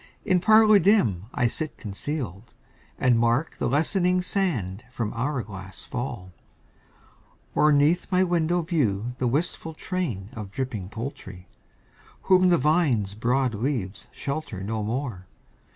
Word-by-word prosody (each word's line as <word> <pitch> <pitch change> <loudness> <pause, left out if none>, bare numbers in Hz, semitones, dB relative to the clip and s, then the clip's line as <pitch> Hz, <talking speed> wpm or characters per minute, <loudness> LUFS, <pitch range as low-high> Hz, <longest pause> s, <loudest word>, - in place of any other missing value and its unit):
In 180 - +3
parlour 215 +2 +6
dim 120 - +3
I 125 - 0
sit 150 +6 -2
concealed, 110 - -5 0.4
And 125 -2 +3
mark 120 +7 +1
the - - -1
lessening 180 - +2
sand 125 - -1
from 115 -4 -3
hour 125 +2 -1
glass 95 -2 -8
fall; 105 -7 -5 1.2
Or 150 0 +4
'neath 150 +6 +3
my 185 0 +4
window 175 -1 +1
view 125 - 0
the 125 - +1
wistful 160 +4 -2
train 145 - -3
Of 105 -4 -7
dripping 110 -4 -4
poultry, 105 -5 -7 0.8
whom 185 -1 +5
the 175 - +5
vine's 145 - +2
broad 125 +3 +1
leaves 110 -4 -3
Shelter 140 -9 -5
no 110 +2 -2
more. 110 -4 -4
130 Hz, 130 wpm, -25 LUFS, 105-165 Hz, 1.2 s, parlour